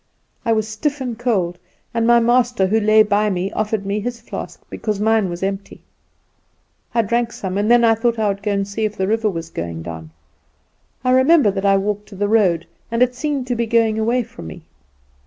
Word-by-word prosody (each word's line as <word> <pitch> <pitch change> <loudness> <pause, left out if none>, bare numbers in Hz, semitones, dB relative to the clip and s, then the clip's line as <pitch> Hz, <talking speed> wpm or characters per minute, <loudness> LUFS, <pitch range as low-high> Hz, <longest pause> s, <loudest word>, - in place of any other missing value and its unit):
I 230 - +2
was 220 -1 +1
stiff 285 +7 -2
and 250 -3 -3
cold; 195 -8 -1 0.3
and 230 -1 +1
my 235 0 +6
master, 240 -3 +2
who 215 +4 +2
lay 215 0 +5
by 210 0 +1
me, 185 0 -2
offered 215 -1 -2
me 200 +2 -1
his 240 +2 -4
flask, - - -7
because 210 -2 -3
mine 220 -2 +2
was 175 +1 -5
empty. 195 +1 -4 1.1
I 230 - +4
drank 235 +2 0
some, 190 -4 -5
and 205 +2 0
then 240 0 +5
I 225 -1 +5
thought 230 +1 0
I 215 -1 +1
would 200 0 -3
go 205 0 -1
and 200 -1 -1
see 200 +2 -4
if 215 0 -2
the 190 - 0
river 220 +1 +1
was 165 -3 -6
going 85 -1 -5
down. 80 -1 -8 0.9
I 255 - +2
remember 260 -2 +5
that 195 0 -3
I 195 0 +5
walked 205 +1 -2
to 200 - -11
the 205 +1 0
road, 190 -6 +2 0.2
and 230 +1 +3
it 250 0 +1
seemed 275 0 -2
to 250 -1 -2
be 235 0 -1
going 225 -1 +2
away 235 +3 +1
from 85 - -11
me. 80 - -10
215 Hz, 215 wpm, -20 LUFS, 195-235 Hz, 1.1 s, my